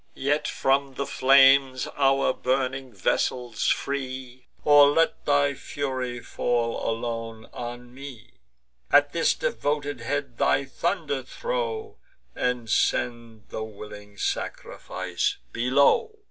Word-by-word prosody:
Yet 145 +3 0
from 135 0 0
the 140 - -2
flames 135 -1 +5
our 135 -1 +3
burning 130 0 -1
vessels 115 +4 -1
free, 130 -2 -3 0.2
Or 145 -1 +7
let 165 +3 +1
thy 145 0 +3
fury 130 -3 -4
fall 120 -2 -1
alone 115 -1 -4
on 120 0 -7
me! 130 -4 -10 0.6
At - - +5
this - - +2
devoted 145 +3 -2
head 140 0 -3
thy 135 +1 +2
thunder 155 0 -2
throw, 450 - -4 0.4
And 125 -2 -1
send 115 -1 -1
the 110 - -4
willing 105 -1 -10
sacrifice 95 -2 -3
below!" 140 - +2
130 Hz, 105 wpm, -25 LUFS, 120-140 Hz, 0.6 s, Or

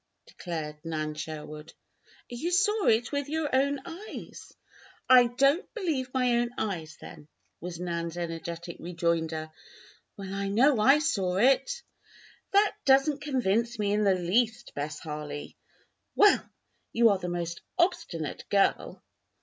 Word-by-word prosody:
declared 155 -4 -6
Nan 155 -2 -3
Sherwood. 155 0 -7 0.5
"You 245 +8 -3
saw 405 +3 +2
it 225 +2 +3
with 285 -1 -2
your 310 -3 -1
own 280 +1 +2
eyes!" 355 +5 -9 0.6
"I 250 -1 +7
don't 275 - +2
believe 305 - -2
my 250 -2 +2
own 240 0 0
eyes, 165 -7 -4
then!" 150 - -12 0.3
was 175 0 -7
Nan's 170 -1 -3
energetic 170 0 -5
rejoinder. 165 -2 -2 0.7
"Well, 195 -1 -6
I 200 0 -2
know 245 +6 +4
I 270 +7 +6
saw 200 - 0
it!" 270 - +2 0.7
"That 405 +1 +3
doesn't 275 +1 +3
convince 240 -4 0
me 205 -1 0
in 210 0 +2
the 195 -2 +4
least, 225 +6 0
Bess 150 +2 -4
Harley." 150 -2 -7 0.6
"Well! 415 -1 +5 0.4
you 230 0 +5
are 200 -2 +2
the 180 -1 -4
most 170 -1 -4 0.2
obstinate 190 - -1
girl!" 200 -1 +1
205 Hz, 135 wpm, -28 LUFS, 170-275 Hz, 0.7 s, I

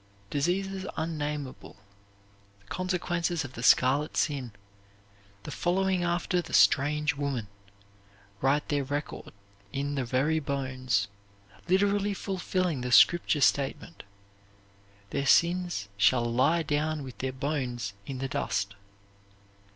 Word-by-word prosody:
Diseases 190 +6 -1
unnameable, 150 -4 -4 0.8
the 100 - -27
consequences 175 - -1
of 130 - -9
the 115 - -7
Scarlet 130 +4 +3
Sin, 135 -6 -1 0.9
the - - -7
following 185 0 +1
after 175 +1 0
the - - -11
"strange 150 +2 +4
woman," 140 -6 -2 0.9
write 140 +3 +2
their 145 -2 +1
record 145 +2 -5 0.4
in 140 +1 -2
the 135 -2 -1
very 135 +6 +1
bones, 130 -6 -1 0.6
literally 200 +2 +2
fulfilling 185 -6 -2
the 125 0 -3
Scripture 170 +2 +5
statement 140 +5 +1 1.1
"Their 140 -1 -1
sins 175 - +2
shall 120 +4 +4
lie 135 +8 +2
down 150 0 -1
with 130 -2 -10
their 130 0 -2
bones 130 -6 -3
in 135 - -4
the 135 +1 -3
dust." 105 -7 -2
145 Hz, 110 wpm, -28 LUFS, 130-175 Hz, 1.1 s, Scripture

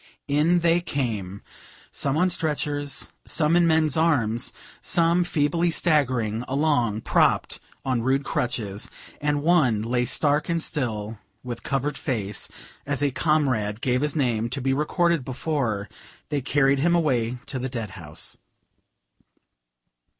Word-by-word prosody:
In 155 +5 +3
they 170 +1 +3
came, 110 - -3 0.5
some 140 +1 0
on 180 +2 +3
stretchers, 145 -4 -1
some 155 +1 +2
in 175 -1 +5
men's 160 -2 +3
arms, 125 -8 +1 0.3
some 170 +1 +2
feebly 170 +1 +1
staggering 130 - +1
along 130 -7 +1
propped - - +2 0.3
on 130 -3 +1
rude 135 +3 +1
crutches, 105 -6 -2 0.3
and 145 -1 0
one 145 -11 +3
lay 120 +2 0
stark 150 +5 +1
and 170 0 +1
still 110 -9 -3 0.2
with 120 -2 -6
covered 135 +1 -2
face, 105 -6 -2 0.3
as 145 0 -1
a 140 - +2
comrade 130 -9 +1
gave 125 0 +1
his 150 +1 -1
name 120 -6 0
to 125 - -3
be 135 +1 +1
recorded 165 +2 +1
before 125 -6 -2 0.4
they 145 -2 -1
carried 140 0 +2
him 170 +4 +3
away 125 -7 +1
to 135 - -4
the 130 +1 -3
dead 115 -5 -5
house. 80 -5 -7
140 Hz, 135 wpm, -25 LUFS, 120-155 Hz, 0.5 s, in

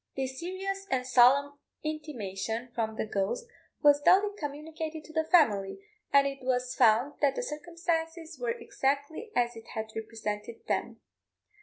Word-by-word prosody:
This 265 -1 -3
serious 390 +2 -4
and 255 -4 0
solemn 270 +3 +5 0.2
intimation 240 -7 -4
from 220 -2 -2
the - - -2
ghost 200 - -1 0.4
was 290 0 +6
duly 400 +6 +5
communicated 310 0 -5
to 315 - -13
the 320 0 +2
family, 220 - +3 0.3
and 280 0 +6
it 275 -1 -3
was 250 0 0
found 230 +6 +3
that 285 -2 +3
the - - -2
circumstances 325 - -3
were 245 -1 -2
exactly 285 - -2
as 240 -1 +1
it 225 0 -11
had 220 0 -4
represented 220 0 -5
them. - - -2
280 Hz, 145 wpm, -30 LUFS, 235-320 Hz, 0.4 s, was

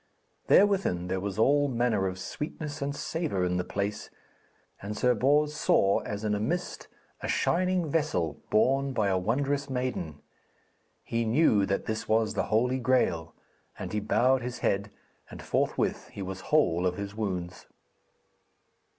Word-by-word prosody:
Therewith 190 - +3
there 95 0 -1
was 100 0 -4
all 145 +6 +4
manner 120 -6 +1
of 95 0 -4
sweetness 150 - -6
and 140 +1 -2
savour 150 - -2
in 90 0 0
the 90 - 0
place, 100 +2 -3 0.7
and 105 +2 -5
Sir 125 +2 +3
Bors 145 +5 +2
saw 100 -8 +3
as 105 0 -5
in 105 -1 0
a 105 - 0
mist 175 +12 -3 0.3
a - - -3
shining 180 -1 +1
vessel 140 - -1
borne 135 +5 +2
by 105 -5 +1
a 95 -1 +1
wondrous 140 +7 -1
maiden. 125 - -3 0.9
He 115 0 -1
knew 110 -4 +3
that 100 - -1
this 110 0 -3
was 110 0 +2
the - - -1
Holy 125 +4 +2
Graal; 100 -11 +1 0.4
and - - -6
he 105 - +1
bowed 125 +5 +2
his 125 +1 -5
head, 100 +2 0 0.4
and - - -10
forthwith - - -1
he 100 - -7
was 95 0 -6
whole 90 - +3
of 90 - -2
his 100 0 -5
wounds. 90 -5 -4
110 Hz, 155 wpm, -28 LUFS, 95-140 Hz, 0.9 s, all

